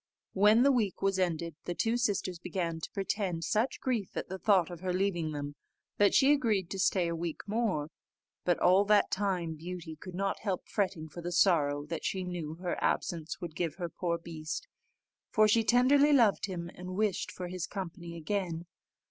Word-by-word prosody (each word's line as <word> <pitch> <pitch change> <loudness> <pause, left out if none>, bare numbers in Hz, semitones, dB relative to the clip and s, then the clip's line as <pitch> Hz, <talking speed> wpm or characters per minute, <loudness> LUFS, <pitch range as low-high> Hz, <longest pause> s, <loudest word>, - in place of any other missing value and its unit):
When 210 +4 +5
the 280 - +6
week 220 -9 0
was 195 -1 +2
ended, 170 -2 -1
the 175 - -3
two 225 +5 +1
sisters 200 -7 -1
began 170 -2 -3
to - - -6
pretend 195 -3 -2
such 220 +9 0
grief 235 -7 -2
at - - -3
the 190 +1 -5
thought 185 -3 +3
of 175 - -7
her 185 +1 -2
leaving 180 -4 0
them, 145 -1 -4 0.5
that 205 -1 +5
she 270 +1 +6
agreed 215 -10 0
to 195 - -4
stay 185 -2 +2
a 170 - -2
week 165 -1 -4
more: 200 -8 -1 0.5
but 175 -1 +2
all 185 +3 +5
that 210 0 +4
time 185 -5 0
Beauty 165 0 -7
could 180 +3 -9
not 195 +1 -1
help 195 -4 -3
fretting 185 -6 -1
for 170 +3 -9
the 175 +1 -4
sorrow 150 -5 +3
that 165 +2 -5
she 190 -1 -1
knew 170 -4 -4
her 175 +1 -3
absence 165 -2 -1
would 170 -3 -6
give 165 -4 -2
her 175 -2 -4
poor 170 0 -2
beast; 160 -2 -6 0.6
for 215 0 +4
she 225 +2 +4
tenderly 275 +6 +5
loved 230 -7 +4
him, 170 -3 -5
and 180 - -9
much 185 - -5
wished 210 -3 0
for 180 - -6
his 180 -2 -4
company 170 -3 -6
again. 170 -1 -2
180 Hz, 195 wpm, -31 LUFS, 170-205 Hz, 0.6 s, the